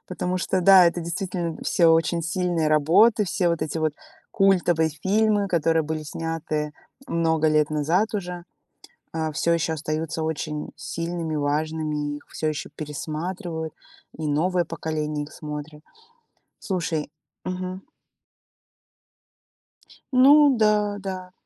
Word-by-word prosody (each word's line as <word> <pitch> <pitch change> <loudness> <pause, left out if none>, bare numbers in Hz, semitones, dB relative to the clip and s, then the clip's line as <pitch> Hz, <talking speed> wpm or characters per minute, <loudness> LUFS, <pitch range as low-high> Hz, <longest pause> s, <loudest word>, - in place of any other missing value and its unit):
потому 180 0 -2
что 185 +1 0
да, 185 0 +8
это 170 +1 0
действительно 170 0 -3
всё 165 -2 +4
очень 165 +1 +2
сильные 170 -1 0
работы, 175 +9 +4
все 175 0 0
вот 170 -2 0
эти 155 +1 -3
вот 155 -1 0 0.4
культовые 175 -5 +3
фильмы, 205 +5 +1
которые 165 -2 +2
были 155 0 -3
сняты 155 -1 -3 0.3
много 160 - +1
лет 155 -1 +2
назад 165 +9 +1
уже, 180 -3 -4 0.7
а, 160 -1 -1
всё 170 +3 +1
еще 165 -1 0
остаются 160 +1 -3
очень 155 -1 -3
сильными, 165 -1 -4
важными, 150 0 -1
их - - -16
всё 155 - -3
еще 150 - -5
пересматривают, 160 +2 -5 0.4
и 155 -1 -3
новое 175 +4 +1
поколение 150 -2 -3
их 150 - -14
смотрит. 150 0 -7 0.8
Слушай 165 -6 -2 0.3
Мгм. 185 +1 -4 2.3
Ну 280 +2 +7
да-да. 205 -4 0
165 Hz, 115 wpm, -24 LUFS, 155-185 Hz, 2.3 s, да